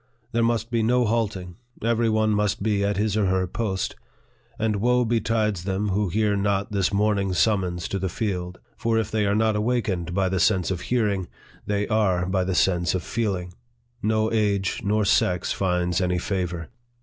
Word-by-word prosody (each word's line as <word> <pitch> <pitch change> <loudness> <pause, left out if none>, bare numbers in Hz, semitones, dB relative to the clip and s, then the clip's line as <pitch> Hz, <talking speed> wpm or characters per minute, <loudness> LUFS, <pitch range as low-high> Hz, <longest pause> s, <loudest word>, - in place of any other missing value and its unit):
There 115 - +1
must 115 0 0
be 115 -1 +1
no 125 +2 +2
halting; 105 -6 -2 0.3
every 115 0 +2
one 110 0 +2
must 105 -2 0
be 105 -2 +1
at 100 -1 0
his 105 0 0
or 105 -3 +2
her 95 0 +1
post; 95 0 -2 0.6
and 110 -2 0
woe 125 +3 +2
betides 110 -4 0
them 100 +2 -1
who 100 0 0
hear 105 +2 +1
not 100 +1 0
this 100 -2 +1
morning 100 -2 +1
summons 90 -3 +1
to 100 - -2
the 95 0 -2
field; 90 -2 -3 0.2
for 115 -2 0
if 110 -1 -1
they 105 -2 +1
are 100 - +2
not 110 0 +2
awakened 105 -6 -1
by 95 -1 +2
the 95 0 -1
sense 90 +2 +2
of 90 -2 -3
hearing, 105 -6 0 0.4
they 105 0 0
are 100 -5 +1
by 95 0 0
the 95 0 -1
sense 90 -1 +2
of 90 - -2
feeling: 95 -6 -2 0.5
no 110 +1 +1
age 100 -3 0
nor 105 +1 +1
sex 90 -3 +2
finds 90 -1 0
any 90 -1 +1
favor. 90 -2 -3
100 Hz, 185 wpm, -24 LUFS, 95-110 Hz, 0.6 s, no